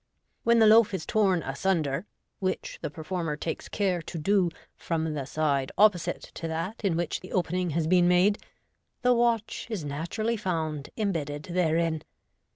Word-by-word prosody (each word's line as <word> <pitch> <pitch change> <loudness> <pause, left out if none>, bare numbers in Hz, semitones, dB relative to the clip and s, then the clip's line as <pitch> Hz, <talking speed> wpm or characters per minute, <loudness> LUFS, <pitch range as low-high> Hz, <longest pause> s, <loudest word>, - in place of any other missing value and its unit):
When 235 0 +4
the 225 - +6
loaf 215 -2 +6
is 160 - -5
torn 190 -6 +2
asunder 155 +3 -1 0.3
(which 185 -1 -3
the - - -3
performer 160 +1 -3
takes 160 +1 -4
care 185 -4 0
to 165 - -7
do 185 +2 +2 0.3
from 160 -2 -2
the 140 -3 -4
side 140 -3 0
opposite 200 -5 +3
to 165 - -5
that 165 +8 -4
in 180 -5 +1
which 170 -2 -1
the 185 - -12
opening 180 0 0
has 165 - +1
been 175 +1 +4
made), 180 +4 +4 0.6
the 250 0 +5
watch 235 -2 0
is 200 -9 -3
naturally 175 +11 -2
found 160 -7 -2
imbedded 155 -9 -2
therein. 165 -2 +1
175 Hz, 160 wpm, -28 LUFS, 155-200 Hz, 0.6 s, the